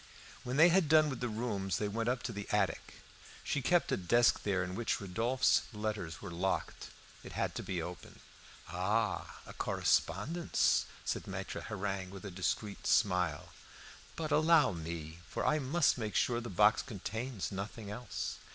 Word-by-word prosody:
When 125 +2 -3
they 165 +3 +8
had 175 -3 +3
done 155 -1 +5
with 130 - -5
the 125 - -1
rooms 105 -4 -2
they 105 - -1
went 115 +3 -1
up 125 0 -1
to 125 - -3
the 100 -1 -6
attic. 105 -2 -1 0.4
She 145 - -1
kept 175 +6 +2
a - - +2
desk 120 +6 +3
there 95 -3 0
in 90 0 -5
which 115 +4 -1
Rodolphe's 115 +7 +2
letters 105 -6 -4
were 100 - -6
locked. 90 +3 -2 0.3
It - - -9
had - - -1
to - - -4
be - - -3
opened. - - -9 0.5
"Ah! 105 +3 -1
a - - -10
correspondence," 160 - +1 0.2
said - - -2
Maitre - - -5
Hareng, 100 -3 -3
with 95 +1 -9
a 100 - -5
discreet 95 +4 -2
smile. 90 -6 +2 0.7
"But 155 -2 -3
allow 155 +1 +5
me, 80 -1 -6
for - - -2
I 155 - +3
must 140 0 +2
make 110 -2 -3
sure 120 -1 +2
the 120 - -6
box 105 +3 +4
contains 110 0 -4
nothing 100 +2 -5
else." 120 +4 -4
105 Hz, 170 wpm, -33 LUFS, 95-125 Hz, 0.7 s, they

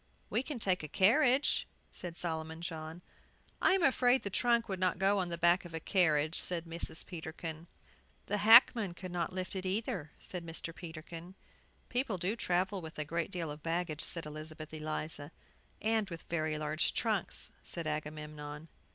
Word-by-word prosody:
"We - - +2
can 280 0 -5
take 190 -5 +1
a 155 - -5
carriage," 250 - +4 0.2
said 175 -2 -6
Solomon 160 -1 -3
John. 160 0 -5 0.6
"I - - +6
am 380 -2 +3
afraid 260 -2 +4
the 200 - -3
trunk 235 +2 +3
would 190 -2 -3
not 185 -1 +2
go 195 +2 +3
on 180 -2 -1
the 170 - -3
back 175 +2 +4
of 170 -2 -8
a - - -2
carriage," 155 -3 +2
said 175 -2 -2
Mrs. 165 -1 -5
Peterkin. 160 -1 -6 0.6
"The 205 +1 -1
hackman 220 -3 +7
could 185 0 -7
not 175 -2 -1
lift 185 +1 -4
it, 190 - -3
either," 190 - -2
said 180 -2 -5
Mr. 165 0 -4
Peterkin. 170 +1 -9 0.5
"People 245 -5 -1
do 185 +5 -1
travel 190 -1 +1
with 160 -1 -9
a 150 - -2
great 170 +3 -1
deal 170 -5 -3
of 150 +1 -8
baggage," 165 -1 -1
said 165 -2 +1
Elizabeth 155 +1 -7
Eliza. 155 -1 -4 0.5
"And 220 -2 +2
with 165 -2 -7
very 155 -2 -1
large 155 +1 0
trunks," 215 -6 +1
said 170 -2 -3
Agamemnon. 150 0 -5
170 Hz, 170 wpm, -33 LUFS, 160-195 Hz, 0.6 s, hackman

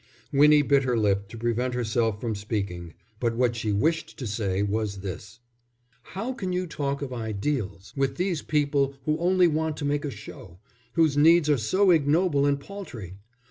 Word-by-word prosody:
Winnie 150 +1 +6
bit 140 -1 +3
her 125 -3 0
lip 100 -2 +1
to 115 - -10
prevent 120 +2 -1
herself 115 -3 0
from 115 0 -2
speaking, 100 -5 -4 0.2
but 115 -2 0
what 120 0 +1
she 110 -2 -2
wished 160 +11 0
to 130 - -5
say 100 -3 -1
was 105 -1 -2
this: 100 +5 -8 0.6
"How 225 - -5
can 190 -7 -4
you 180 0 -1
talk 140 -4 -3
of 130 -2 -5
ideals 110 - -3
with 135 -1 0
these 180 -1 -1
people 140 -2 +1
who 155 - +2
only 180 +1 +4
want 160 -1 -1
to 145 - -4
make 145 0 0
a 145 - -2
show, 100 -6 -11 0.4
whose 160 -4 +2
needs 160 +1 +5
are 145 - +3
so 185 - +3
ignoble 150 -1 +3
and 140 0 +1
paltry? 125 - -9
135 Hz, 180 wpm, -26 LUFS, 110-150 Hz, 0.6 s, Winnie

